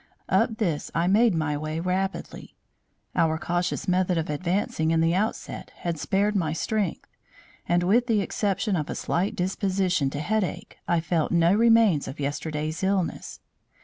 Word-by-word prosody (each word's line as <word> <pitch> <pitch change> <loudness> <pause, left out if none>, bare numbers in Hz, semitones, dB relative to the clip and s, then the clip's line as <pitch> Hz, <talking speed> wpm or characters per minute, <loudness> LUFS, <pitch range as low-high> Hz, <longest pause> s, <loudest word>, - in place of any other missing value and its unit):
Up 220 - +2
this 170 -9 -1
I 165 +2 +2
made 210 +2 +4
my 155 -2 0
way 155 +2 -3
rapidly. 185 +3 -3 0.6
Our 160 -1 +2
cautious 175 +1 -2
method 180 -1 +2
of 160 -2 -1
advancing 170 0 -1
in 165 0 +2
the 165 +1 +3
outset 205 +5 -2
had 170 -3 -4
spared 205 +5 +1
my 160 -5 0
strength; 200 +2 -2 0.6
and, 175 0 +3
with 235 +7 +3
the 220 -4 +2
exception 200 +1 -1
of 155 -4 -2
a - - -3
slight 185 +4 -1
disposition 185 -4 0
to 145 - -5
headache, 210 +4 -2
I 170 -1 +2
felt 165 -2 0
no 170 +1 +4
remains 225 -7 +4
of 140 - -7
yesterday's 150 +2 -3
illness. 190 -3 -1
175 Hz, 155 wpm, -25 LUFS, 160-200 Hz, 0.6 s, made